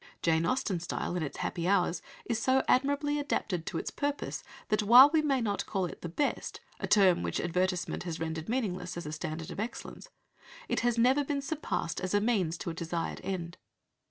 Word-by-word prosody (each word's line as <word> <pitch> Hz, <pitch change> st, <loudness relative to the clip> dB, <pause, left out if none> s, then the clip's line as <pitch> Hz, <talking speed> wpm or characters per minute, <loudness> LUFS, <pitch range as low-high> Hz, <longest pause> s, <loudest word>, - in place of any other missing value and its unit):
Jane 165 Hz, 0 st, +2 dB
Austen's 190 Hz, -9 st, -1 dB
style, 175 Hz, -, -3 dB
in 180 Hz, -, -1 dB
its 150 Hz, -, -4 dB
happy 170 Hz, -1 st, -2 dB
hours, 185 Hz, -3 st, +2 dB, 0.2 s
is 230 Hz, -2 st, -1 dB
so 260 Hz, +2 st, +3 dB
admirably 285 Hz, +2 st, +2 dB
adapted 185 Hz, -, -2 dB
to -, -, -2 dB
its -, -, -3 dB
purpose 285 Hz, 0 st, -3 dB, 0.3 s
that, 215 Hz, 0 st, +2 dB
while 245 Hz, +7 st, +9 dB
we 320 Hz, -, +5 dB
may 275 Hz, -4 st, +1 dB
not 205 Hz, -3 st, -1 dB
call 190 Hz, -2 st, 0 dB
it 175 Hz, -, -8 dB
"the 170 Hz, -, -5 dB
best," 280 Hz, -, -2 dB, 0.2 s
a -, -, -3 dB
term 190 Hz, -4 st, +5 dB
which -, -, -2 dB
advertisement 180 Hz, +1 st, -1 dB
has 170 Hz, -2 st, -4 dB
rendered 160 Hz, +1 st, -4 dB
meaningless 200 Hz, -8 st, -2 dB
as 175 Hz, -, -5 dB
a 150 Hz, -, -5 dB
standard 155 Hz, +1 st, -5 dB
of -, -, -7 dB
excellence, 225 Hz, +3 st, -6 dB, 0.6 s
it -, -, 0 dB
has 240 Hz, 0 st, +1 dB
never 260 Hz, +5 st, +4 dB
been 280 Hz, 0 st, -2 dB
surpassed 275 Hz, -, -3 dB
as 185 Hz, +2 st, -1 dB
a -, -, +5 dB
means 200 Hz, -7 st, +1 dB
to 170 Hz, -, -4 dB
a -, -, -6 dB
desired 165 Hz, 0 st, -3 dB
end. 180 Hz, -2 st, -4 dB
190 Hz, 200 wpm, -30 LUFS, 170-255 Hz, 0.6 s, while